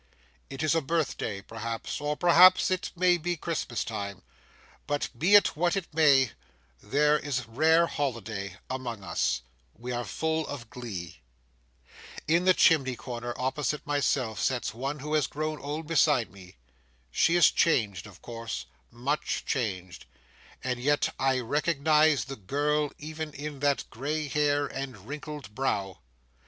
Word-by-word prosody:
It 135 +2 -5
is 155 - +3
a 165 - +2
birthday, 135 -10 -2
perhaps, 115 +4 -5
or 150 0 -1
perhaps 180 +2 +6
it 185 0 -1
may 180 0 +3
be 175 +2 -2
Christmas 150 -7 -2
time; 100 -4 -5 0.6
but 145 0 -1
be 175 +12 +4
it 205 - +6
what 175 +4 +1
it 180 -5 -5
may, 140 -5 +5 0.5
there 150 +7 +2
is 130 -5 -2
rare 160 +9 +4
holiday 110 - -4
among 125 -5 -5
us; 65 -8 -1 0.3
we 125 +2 -6
are 120 0 -2
full 160 +8 -2
of 120 -6 -7
glee. 100 -9 -7 1.1
In 170 +4 +3
the 185 -1 +5
chimney 135 -7 +4
comer, 120 -1 -6
opposite 135 +2 -2
myself, 140 -6 0
sits 125 -2 0
one 135 +5 -3
who 150 +2 -4
has 150 -5 +2
grown 155 +1 -3
old 150 +3 -5
beside 150 - +2
me. 90 -6 -15 0.5
She 170 - +3
is 175 -4 +6
changed, 100 - +1
of - - -16
course; 115 -1 -5 0.2
much 135 +6 -2
changed; 95 - -3 0.6
and 125 -1 -2
yet 145 +3 +1
I 130 -1 +2
recognise 150 +2 +2
the 135 0 -7
girl 145 +8 0
even 155 0 -6
in 145 0 -6
that 145 0 +1
gray 145 +6 -2
hair 145 0 +1
and 130 -8 -7
wrinkled 150 -4 -7
brow. 100 -7 -2
140 Hz, 145 wpm, -28 LUFS, 115-155 Hz, 1.1 s, perhaps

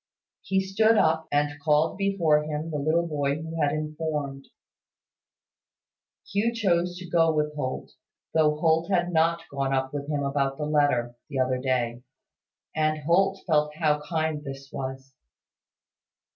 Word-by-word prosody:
He 190 0 +1
stood 220 +4 +3
up, 160 -3 +2
and 145 0 0
called 150 +1 +3
before 190 -7 +2
him 155 +1 -4
the 150 - -2
little 160 +4 +1
boy 145 -3 0
who 160 0 -5
had 145 -1 +3
informed. 150 -2 -3 1.8
Hugh 225 +4 0
chose 180 -5 +1
to 180 0 -8
go 165 -1 +3
with 150 -1 0
Holt, 130 -3 -4 0.4
though 155 -1 +3
Holt 165 +2 +2
had 175 -2 +1
not 165 +1 +2
gone 135 -1 -1
up 130 0 -1
with 145 0 -4
him 145 -2 -1
about 140 -1 0
the 150 - -3
letter, 145 -6 +1 0.2
the 140 - -4
other 130 0 +1
day; 125 -2 -1 0.7
and 155 -1 0
Holt 190 +5 +2
felt 150 -3 +1
how 150 -2 +1
kind 155 -1 -2
this 135 -1 -8
was. 135 0 -6
150 Hz, 145 wpm, -26 LUFS, 140-165 Hz, 1.8 s, stood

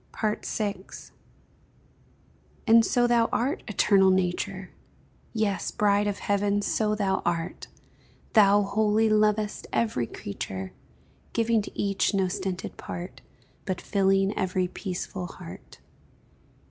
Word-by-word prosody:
VI. 215 -1 -1 1.9
And 230 -1 +7
so 240 +2 +2
thou 235 -1 +3
art, 260 +5 0
Eternal 195 -2 +4
Nature! 185 +1 -1 0.6
Yes, 215 -3 -1
bride 205 -2 +2
of 200 -1 -1
Heaven, 205 0 0
so 210 0 +1
thou 195 -2 0
art; 170 -1 -2 0.7
Thou, 205 -2 +6
wholly 215 +2 +2
lovest 215 0 +1
every 125 - 0
creature, 95 -1 -6 0.6
Giving 230 -1 +2
to - - -9
each 200 +1 +1
no 190 -1 +2
stinted 190 -1 -4
part, 175 +2 -7 0.4
But 185 -3 -2
filling 195 0 +2
every 185 -2 0
peaceful 180 -1 -5
heart. 185 0 -11
200 Hz, 110 wpm, -27 LUFS, 190-215 Hz, 1.9 s, And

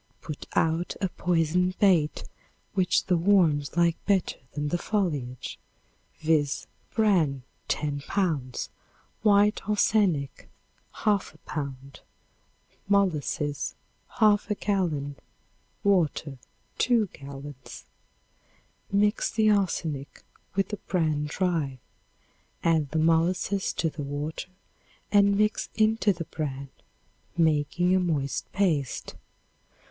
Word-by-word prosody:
Put 150 -3 -7
out 165 +2 +1
a 190 - 0
poisoned 180 +2 +1
bait 175 -7 +3 0.5
which 185 -3 +2
the 180 - +2
worms 165 -5 +3
like 170 -1 +2
better 195 -3 +1
than 145 0 -2
the 175 - 0
foliage, 145 - -2 0.6
viz. 155 -3 +1 0.3
Bran, 170 - +2 0.2
10 145 -2 -1
pounds; 155 -11 -1 0.5
white 210 0 +4
arsenic, 200 -9 +1 0.5
1/2 205 -6 0
pound; 140 -2 -6 0.9
molasses, 150 -7 0 0.4
1/2 210 -1 +3
gallon; 155 -9 -1 0.7
water, 160 -8 +1 0.4
2 235 -3 +3
gallons. 140 -1 -10 1.1
Mix 205 +1 +2
the 215 -1 +3
arsenic 165 -8 -1 0.3
with 195 0 +1
the 210 - -3
bran 155 -7 0
dry. 160 -5 -1 0.9
Add 160 -4 +2
the 160 - -2
molasses 170 +5 +2
to 165 - 0
the 155 -1 -5
water 145 +5 -4 0.6
and 200 -1 +5
mix 210 +1 +1
into 220 -1 +3
the 170 -3 -4
bran, 140 -4 -4 0.7
making 160 +2 +2
a - - +4
moist 145 -7 -1
paste. 160 -10 0
165 Hz, 100 wpm, -27 LUFS, 145-200 Hz, 1.1 s, and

